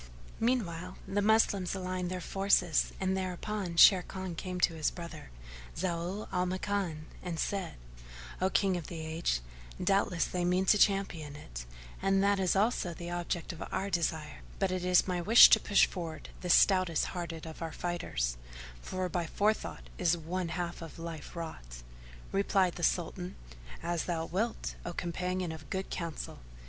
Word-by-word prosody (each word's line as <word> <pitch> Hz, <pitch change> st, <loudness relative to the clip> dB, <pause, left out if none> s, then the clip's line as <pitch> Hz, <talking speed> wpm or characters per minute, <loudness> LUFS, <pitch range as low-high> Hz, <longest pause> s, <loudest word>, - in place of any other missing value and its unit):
Meanwhile, 185 Hz, -7 st, -1 dB
the 205 Hz, +1 st, 0 dB
Moslems 205 Hz, -3 st, +3 dB
aligned 185 Hz, -1 st, -3 dB
their 185 Hz, 0 st, -3 dB
forces 195 Hz, -3 st, +2 dB
and 190 Hz, 0 st, +1 dB
thereupon 185 Hz, 0 st, -3 dB
Sharrkan 185 Hz, 0 st, +5 dB
came 180 Hz, +1 st, -4 dB
to 165 Hz, -, +4 dB
his 155 Hz, -2 st, 0 dB
brother, 170 Hz, -, -9 dB, 0.5 s
Zau 180 Hz, +3 st, -2 dB
al 180 Hz, 0 st, +1 dB
Makan, 185 Hz, -4 st, -2 dB, 0.2 s
and 175 Hz, -2 st, -4 dB
said, 195 Hz, -4 st, -2 dB, 0.7 s
"O 185 Hz, -, +3 dB
King 190 Hz, -1 st, +2 dB
of 170 Hz, -, -6 dB
the 170 Hz, -, -6 dB
Age, 160 Hz, -, -1 dB, 0.4 s
doubtless 195 Hz, -3 st, +2 dB
they 180 Hz, -1 st, -2 dB
mean 180 Hz, +2 st, +2 dB
to 205 Hz, +2 st, +5 dB
champion 180 Hz, -8 st, +1 dB
it, -, -, -8 dB, 0.3 s
and 195 Hz, 0 st, +3 dB
that 200 Hz, 0 st, +3 dB
is 185 Hz, -1 st, +2 dB
also 195 Hz, -4 st, +1 dB
the 175 Hz, +1 st, -6 dB
object 175 Hz, 0 st, -3 dB
of 170 Hz, -, -11 dB
our 195 Hz, +1 st, -2 dB
desire; 160 Hz, -4 st, -1 dB, 0.2 s
but 195 Hz, -2 st, +1 dB
it 185 Hz, -1 st, -2 dB
is 180 Hz, +1 st, +4 dB
my 180 Hz, -2 st, 0 dB
wish 220 Hz, +7 st, +9 dB
to 220 Hz, -, +8 dB
push 200 Hz, -, +4 dB
forward 165 Hz, -5 st, -6 dB
the 180 Hz, -, -5 dB
stoutest 185 Hz, -3 st, +5 dB
hearted 170 Hz, -3 st, -5 dB
of 160 Hz, 0 st, -9 dB
our 165 Hz, -1 st, -3 dB
fighters, -, -, -2 dB, 0.4 s
for 185 Hz, -, -3 dB
by 175 Hz, -1 st, -2 dB
forethought 210 Hz, +6 st, -1 dB
is 175 Hz, -1 st, +3 dB
one 175 Hz, +2 st, -3 dB
half 175 Hz, 0 st, -4 dB
of 165 Hz, -2 st, -9 dB
life 165 Hz, -2 st, -7 dB
wrought." -, -, -7 dB, 0.5 s
Replied 195 Hz, -2 st, +2 dB
the -, -, -8 dB
Sultan, 180 Hz, +2 st, -1 dB, 0.5 s
"As 170 Hz, -1 st, -1 dB
thou 165 Hz, -2 st, -1 dB
wilt, 215 Hz, +8 st, -2 dB
O 175 Hz, -, -5 dB
companion 180 Hz, +1 st, -2 dB
of 155 Hz, -1 st, -9 dB
good 190 Hz, 0 st, -3 dB
counsel!" 170 Hz, -3 st, -5 dB
180 Hz, 160 wpm, -31 LUFS, 165-190 Hz, 0.7 s, wish